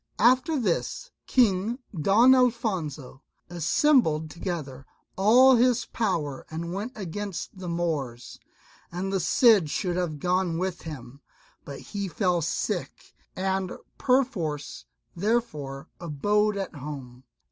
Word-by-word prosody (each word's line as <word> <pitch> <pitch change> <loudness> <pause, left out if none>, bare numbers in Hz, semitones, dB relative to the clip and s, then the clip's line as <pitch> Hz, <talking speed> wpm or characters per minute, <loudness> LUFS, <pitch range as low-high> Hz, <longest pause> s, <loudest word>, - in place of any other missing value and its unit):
After 255 +6 +3
this 240 - -2 0.2
King 220 -1 +2 0.2
Don 210 - +5
Alfonso 190 - 0 0.3
assembled 165 - +2
together 150 -6 -5 0.3
all 245 +6 +6
his 245 0 +3
power 150 - -2
and 170 +2 -5
went 210 +7 -4
against 195 0 -6
the 180 -2 -5
Moors. 150 -8 -3 0.5
And 190 +3 -3
the 195 - +1
Cid 200 - +4
should 180 +2 -1
have 170 -4 -2
gone 180 +1 0
with 185 0 -3
him, 140 -3 -9 0.4
but 140 -1 -8
he 200 -1 -5
fell 180 -2 0
sick 165 - -3 0.2
and 190 0 -1 0.3
perforce 205 - 0 0.3
therefore 165 - -2
abode 205 +6 +1
at 195 -2 -4
home. 130 -3 -8
180 Hz, 115 wpm, -26 LUFS, 155-215 Hz, 0.5 s, all